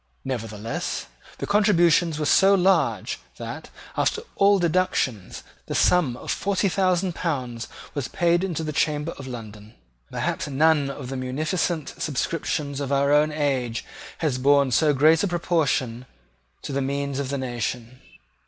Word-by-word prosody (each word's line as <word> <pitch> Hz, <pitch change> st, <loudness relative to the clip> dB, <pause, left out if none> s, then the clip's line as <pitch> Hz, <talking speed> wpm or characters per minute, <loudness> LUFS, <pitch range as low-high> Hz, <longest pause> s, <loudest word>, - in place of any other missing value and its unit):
Nevertheless 115 Hz, -3 st, -4 dB, 0.3 s
the -, -, -4 dB
contributions 175 Hz, -6 st, +3 dB
were 155 Hz, -, -1 dB
so 195 Hz, +6 st, +5 dB
large 190 Hz, 0 st, +1 dB, 0.2 s
that, -, -, -7 dB, 0.3 s
after 445 Hz, -, 0 dB
all 200 Hz, 0 st, +5 dB
deductions, 170 Hz, -, 0 dB, 0.2 s
the -, -, -3 dB
sum 150 Hz, -9 st, +3 dB
of -, -, -5 dB
forty 200 Hz, 0 st, 0 dB
thousand 185 Hz, -1 st, +1 dB
pounds 125 Hz, -10 st, -3 dB, 0.3 s
was 140 Hz, -4 st, -3 dB
paid 175 Hz, +1 st, +1 dB
into 170 Hz, -4 st, -2 dB
the 155 Hz, -1 st, -3 dB
Chamber 150 Hz, +1 st, 0 dB
of 135 Hz, -, -7 dB
London. 110 Hz, -3 st, -9 dB, 0.3 s
Perhaps -, -, -2 dB
none 145 Hz, 0 st, +3 dB
of 130 Hz, -2 st, -7 dB
the 135 Hz, -, -4 dB
munificent 155 Hz, +5 st, -2 dB
subscriptions 145 Hz, -1 st, -2 dB
of 140 Hz, -1 st, -3 dB
our 140 Hz, +1 st, +3 dB
own 150 Hz, +1 st, +4 dB
age 135 Hz, -6 st, -1 dB, 0.3 s
has 145 Hz, -6 st, -1 dB
borne 140 Hz, 0 st, +4 dB
so 150 Hz, +4 st, +4 dB
great 155 Hz, +3 st, +4 dB
a -, -, +2 dB
proportion 150 Hz, -9 st, 0 dB, 0.6 s
to -, -, -5 dB
the 140 Hz, -, 0 dB
means 140 Hz, 0 st, -2 dB
of 140 Hz, -2 st, -3 dB
the 140 Hz, -, -1 dB
nation. 125 Hz, -1 st, -4 dB
145 Hz, 145 wpm, -24 LUFS, 130-170 Hz, 0.6 s, so